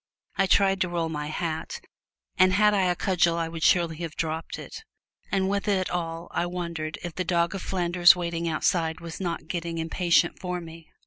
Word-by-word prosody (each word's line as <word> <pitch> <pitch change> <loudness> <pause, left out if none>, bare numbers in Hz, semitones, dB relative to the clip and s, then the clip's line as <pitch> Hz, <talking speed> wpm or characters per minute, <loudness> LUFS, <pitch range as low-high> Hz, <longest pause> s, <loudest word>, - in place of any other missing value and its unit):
I 195 - +2
tried 195 0 +3
to 180 - +1
roll 170 -2 -1
my 150 -2 -4
hat, 160 +1 -4 0.6
and 185 0 +4
had 210 +1 +4
I 195 -2 +2
a 180 -1 +2
cudgel 175 -2 +2
I 165 -1 -1
would 165 0 -7
surely 170 -1 +3
have 165 -2 -6
dropped 160 0 -3
it; 450 - -9 0.5
and 190 -1 +1
with 200 +1 -1
it 190 -3 +1
all 165 -1 -3
I 175 - -1
wondered 170 -3 -4
if 175 -2 -5
the 185 - -2
dog 170 0 +1
of 195 - -4
Flanders 175 -1 +4
waiting 170 -1 -2
outside 160 0 0
was 165 -1 -8
not 170 -4 -3
getting 170 0 -3
impatient 170 +1 +1
for 180 -1 -3
me! 165 -1 -11
170 Hz, 195 wpm, -26 LUFS, 165-185 Hz, 0.6 s, and